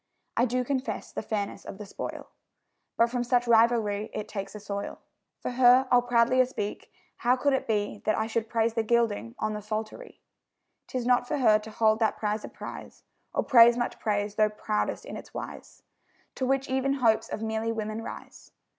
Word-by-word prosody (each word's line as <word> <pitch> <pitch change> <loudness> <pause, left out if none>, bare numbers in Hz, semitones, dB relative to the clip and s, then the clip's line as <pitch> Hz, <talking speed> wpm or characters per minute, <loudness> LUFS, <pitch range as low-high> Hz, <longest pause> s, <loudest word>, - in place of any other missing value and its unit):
I 240 - +3
do 250 +1 0
confess 265 +1 -3
the - - -4
fairness 205 -2 -3
of - - -8
the 210 - -8
spoil, 200 - -7 0.7
But 230 0 +3
from 245 -1 0
such 245 0 +1
rivalry 225 -2 +3
it 210 - -4
takes 200 -1 -6
a - - -6
soil. 200 0 -5 0.4
For - - -4
her 250 +1 +5
I'll 245 -1 +6
proudlier 245 +1 +3
speak: 210 -5 -5 0.3
how 245 +1 +3
could 280 +2 +1
it 265 - -1
be 210 -2 -1
That 215 - +2
I 220 - 0
should 225 0 -2
praise 230 -1 +1
the 225 - +1
gilding 230 0 0
on 215 0 -1
the 210 - -5
psaltery? 215 - -6 0.7
'Tis 250 -2 -3
not 245 0 +3
for - - -1
her 220 -5 +5
to 215 - -10
hold 220 0 +2
that 220 -2 +1
prize 210 0 -2
a - - -7
prize, - - -9 0.3
Or - - 0
praise 240 -3 +7
much 240 - -2
praise, 205 -1 -1
though 215 0 +3
proudest 210 0 -2
in - - -7
its - - -12
wise, - - -8 0.5
To 260 - -2
which 270 0 +1
even 265 +1 +1
hopes 235 -5 +2
of 215 - -4
merely 220 +1 -1
women 215 0 -3
rise. - - -10
225 Hz, 195 wpm, -28 LUFS, 215-245 Hz, 0.7 s, praise